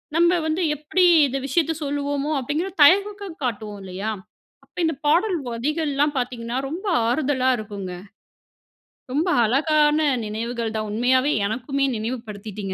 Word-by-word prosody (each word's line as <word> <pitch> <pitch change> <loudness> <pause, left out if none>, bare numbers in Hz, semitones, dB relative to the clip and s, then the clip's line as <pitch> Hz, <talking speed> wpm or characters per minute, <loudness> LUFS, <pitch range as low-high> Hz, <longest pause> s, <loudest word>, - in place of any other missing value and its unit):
நம்ம 340 +1 +5 0.2
வந்து 315 +3 -1
எப்படி 300 +6 0 0.2
இந்த 270 +1 -3
விஷயத்த 320 +4 +1
சொல்வோமோ? 285 0 -2
அப்படிங்கிற 295 +8 -2
தயக்கம் 400 +2 +3
காட்டுவோம் 215 -4 -3
இல்லையா? 190 +3 -4 0.5
அப்போ - - -11
இந்த 320 -1 0
பாடல் 355 +5 +3
வரிகள்லாம் 290 +4 -1
பார்த்தீங்கன்னா, 245 -1 -3
ரொம்ப 350 +8 -6 0.2
ஆறுதலா 260 0 +1
இருக்குங்க. 200 -4 -6 1.2
ரொம்ப 315 +6 +1 0.2
அழகான 295 +5 +3 0.3
நினைவுகள் 225 +1 -3
தான். 215 -1 -3
உண்மையாவே 255 +5 +2 0.2
எனக்குமே 260 +6 -1
நினைவு 230 +4 -3
படுத்திட்டீங்க 205 -2 -6
270 Hz, 125 wpm, -23 LUFS, 225-310 Hz, 1.2 s, நம்ம